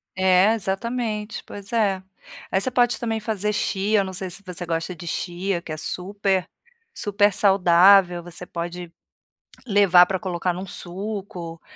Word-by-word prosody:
É, 185 Hz, +3 st, +4 dB
exatamente! 215 Hz, +2 st, -3 dB
Pois 200 Hz, +1 st, -9 dB
é! 200 Hz, -5 st, +1 dB, 0.5 s
Aí 190 Hz, -, +2 dB
você 255 Hz, -, +2 dB
pode, 245 Hz, -1 st, +2 dB
também, 225 Hz, -2 st, -2 dB
fazer 210 Hz, -1 st, -2 dB
chia, 205 Hz, 0 st, +1 dB
não 190 Hz, -1 st, -6 dB
sei 185 Hz, 0 st, -4 dB
se 200 Hz, +3 st, -7 dB
você 180 Hz, -1 st, -6 dB
gosta 165 Hz, +1 st, -2 dB
de 170 Hz, 0 st, -10 dB
chia 175 Hz, +1 st, -2 dB
que 160 Hz, -, -9 dB
é 155 Hz, -, -4 dB
super 190 Hz, +3 st, -2 dB, 0.5 s
super 205 Hz, 0 st, +2 dB
saudável. 185 Hz, -1 st, +5 dB
Você 175 Hz, +1 st, -9 dB
pode 175 Hz, 0 st, -6 dB, 0.7 s
levar 195 Hz, -5 st, +6 dB
pra 190 Hz, 0 st, -2 dB
colocar 180 Hz, -1 st, -2 dB
em -, -, -7 dB
um 185 Hz, -, -5 dB
suco, 180 Hz, -3 st, -6 dB
190 Hz, 155 wpm, -23 LUFS, 175-205 Hz, 0.7 s, levar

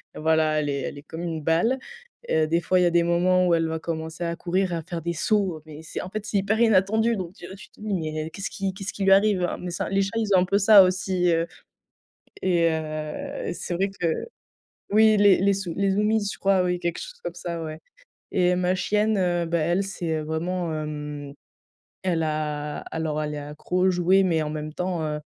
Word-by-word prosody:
heu, -, -, -7 dB
voilà, 155 Hz, -1 st, +2 dB
elle 145 Hz, -1 st, -1 dB
est 140 Hz, -1 st, -1 dB
elle 145 Hz, -, -5 dB
est 145 Hz, -, -14 dB
comme 165 Hz, +2 st, -7 dB
une 165 Hz, -2 st, -3 dB
balle. 170 Hz, -, +2 dB, 0.5 s
Heu, 155 Hz, -1 st, +2 dB
des 165 Hz, +2 st, +2 dB
fois, 185 Hz, +2 st, +2 dB
il -, -, +4 dB
y -, -, +4 dB
a -, -, +1 dB
des 170 Hz, 0 st, +4 dB
moments 180 Hz, +2 st, +3 dB
où 170 Hz, -, +3 dB
elle 165 Hz, -1 st, +1 dB
va 160 Hz, 0 st, -2 dB
commencer 160 Hz, +1 st, -5 dB
à 170 Hz, 0 st, -2 dB
courir 180 Hz, +1 st, -1 dB
et -, -, 0 dB
à 165 Hz, -, -3 dB
faire 170 Hz, -1 st, -5 dB
des 170 Hz, +2 st, -2 dB
sauts. 190 Hz, +1 st, +1 dB
Heu, -, -, -14 dB
mais 155 Hz, 0 st, -10 dB
c'est 160 Hz, -, -5 dB
en 180 Hz, -, -7 dB
fait, 215 Hz, +2 st, -5 dB
c'est 215 Hz, -2 st, -1 dB
hyper 200 Hz, +3 st, 0 dB
inattendu, 220 Hz, +1 st, +3 dB
donc 180 Hz, -2 st, -5 dB
tu 175 Hz, -, -12 dB
tu 195 Hz, -, -13 dB
te -, -, -24 dB
dis: 215 Hz, -, -6 dB
«Mais 155 Hz, -3 st, -3 dB
qu'est-ce 195 Hz, -, -5 dB
qui 195 Hz, -1 st, -3 dB
qu'est-ce 195 Hz, +1 st, -5 dB
qui 200 Hz, -, -4 dB
lui 195 Hz, -, +5 dB
arrive?» 195 Hz, -2 st, +3 dB
heu, 175 Hz, -, -1 dB
mais 180 Hz, -, -5 dB
ça 170 Hz, -, -3 dB
les 195 Hz, 0 st, +2 dB
chats, 195 Hz, -, 0 dB
ils 225 Hz, -, 0 dB
ont -, -, +6 dB
un -, -, +2 dB
peu 200 Hz, +2 st, +2 dB
ça 205 Hz, -1 st, +8 dB
aussi, 185 Hz, -1 st, +1 dB
heu 165 Hz, 0 st, +1 dB, 1.0 s
et 170 Hz, -3 st, +3 dB
heu, 155 Hz, -1 st, -4 dB
c'est 175 Hz, -, -4 dB
vrai 195 Hz, +3 st, 0 dB
que 180 Hz, -3 st, -2 dB, 0.8 s
oui, 215 Hz, +1 st, +5 dB
les 200 Hz, -2 st, +6 dB
les 200 Hz, +2 st, +3 dB
sou 190 Hz, -4 st, -4 dB
les 200 Hz, 0 st, +2 dB
zoomies 210 Hz, +1 st, +1 dB
je -, -, -10 dB
crois, 195 Hz, -1 st, +3 dB
oui. 180 Hz, 0 st, 0 dB
Quelque 170 Hz, -1 st, -2 dB
chose -, -, -8 dB
comme 175 Hz, -1 st, -4 dB
ça 170 Hz, -1 st, -5 dB
ouais 155 Hz, -1 st, -6 dB, 0.5 s
et 180 Hz, -1 st, +3 dB
ma 180 Hz, 0 st, +1 dB
chienne, 210 Hz, +3 st, +1 dB
heu, 175 Hz, -2 st, +1 dB
bah, 170 Hz, +1 st, 0 dB
elle, 175 Hz, +5 st, +1 dB
c'est, 175 Hz, -4 st, -4 dB
heu, -, -, -3 dB
vraiment, 170 Hz, +3 st, -2 dB
hem, 150 Hz, -2 st, -5 dB, 0.7 s
elle 170 Hz, -3 st, 0 dB
a 150 Hz, -1 st, -2 dB
alors 155 Hz, -1 st, -2 dB
elle 150 Hz, 0 st, -3 dB
est -, -, -4 dB
accro 150 Hz, +5 st, -4 dB
aux -, -, +5 dB
jouets, 185 Hz, +2 st, +3 dB
mais 165 Hz, -4 st, +2 dB
en 150 Hz, -, -3 dB
même 155 Hz, 0 st, -5 dB
temps, 180 Hz, -2 st, -2 dB
heu, 150 Hz, 0 st, -3 dB
175 Hz, 240 wpm, -25 LUFS, 160-195 Hz, 1.0 s, ça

